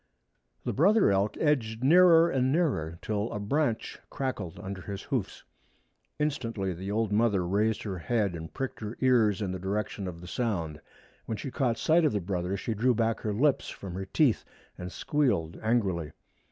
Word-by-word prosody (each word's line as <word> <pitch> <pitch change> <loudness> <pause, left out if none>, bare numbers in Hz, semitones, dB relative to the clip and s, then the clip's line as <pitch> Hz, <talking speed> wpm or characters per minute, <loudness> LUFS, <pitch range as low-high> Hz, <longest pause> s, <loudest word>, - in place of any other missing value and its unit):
The - - -1
brother 195 - +4
elk 100 +2 +1
edged 120 -6 0
nearer 170 +2 +7
and 130 -5 +1
nearer, 130 - 0
till 105 +1 -2
a 105 - -3
branch 120 +2 -1
crackled 130 -11 -4
under 95 -1 -6
his 100 +1 -6
hoofs. - - -3 0.7
Instantly 115 -10 -2
the 95 +3 -6
old 110 0 0
mother 105 -4 +2
raised 105 +5 +1
her 95 -4 -4
head 105 0 0
and 80 -1 -7
pricked 135 -1 -4
her 110 +1 -6
ears 110 -6 +3
in 95 - -2
the 95 - -4
direction 100 +1 -3
of 85 -2 -6
the 90 - -10
sound. 85 -9 -2 0.5
When 110 - -2
she 135 - -5
caught 120 -3 0
sight 165 +2 +3
of 150 - +2
the 105 - +1
brother 90 0 -2
she 110 +4 -3
drew 120 +4 +2
back 115 0 +1
her 105 - -2
lips 135 +7 +1
from 95 -3 -8
her 95 +2 -4
teeth 125 +5 +2 0.3
and 90 0 -7
squealed 120 - 0
angrily. 95 -9 0
110 Hz, 180 wpm, -29 LUFS, 95-130 Hz, 0.7 s, nearer